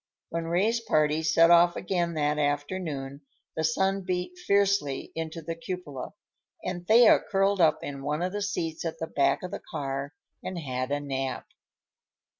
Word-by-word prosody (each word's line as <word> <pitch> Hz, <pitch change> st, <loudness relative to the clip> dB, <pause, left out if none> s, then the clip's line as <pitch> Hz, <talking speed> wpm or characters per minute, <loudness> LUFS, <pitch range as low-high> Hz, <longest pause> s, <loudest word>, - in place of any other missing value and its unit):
When 165 Hz, 0 st, -3 dB
Ray's 195 Hz, +8 st, +1 dB
party 155 Hz, -7 st, +1 dB
set 165 Hz, +2 st, +5 dB
off 175 Hz, 0 st, +6 dB
again 175 Hz, -2 st, -1 dB
that 150 Hz, 0 st, +1 dB
afternoon 145 Hz, -1 st, -2 dB, 0.3 s
the 160 Hz, -, -1 dB
sun 190 Hz, +5 st, +1 dB
beat 180 Hz, -, -3 dB
fiercely 200 Hz, -, +1 dB
into 165 Hz, 0 st, -5 dB
the 165 Hz, +2 st, -3 dB
cupola, 165 Hz, -3 st, -6 dB, 0.5 s
and 175 Hz, -1 st, -5 dB
Thea 230 Hz, +1 st, +7 dB
curled 195 Hz, 0 st, +1 dB
up 155 Hz, -2 st, +3 dB
in 140 Hz, -1 st, -6 dB
one 150 Hz, +4 st, -2 dB
of 185 Hz, +1 st, -2 dB
the 205 Hz, -, -2 dB
seats 165 Hz, -5 st, -2 dB
at 165 Hz, -1 st, -3 dB
the 160 Hz, -, -3 dB
back 140 Hz, -1 st, +1 dB
of 180 Hz, -, -5 dB
the -, -, -5 dB
car 140 Hz, -1 st, -4 dB, 0.3 s
and 185 Hz, -, -5 dB
had 130 Hz, -5 st, -3 dB
a 145 Hz, -, +1 dB
nap. 135 Hz, -2 st, -3 dB
165 Hz, 165 wpm, -27 LUFS, 145-185 Hz, 0.5 s, Thea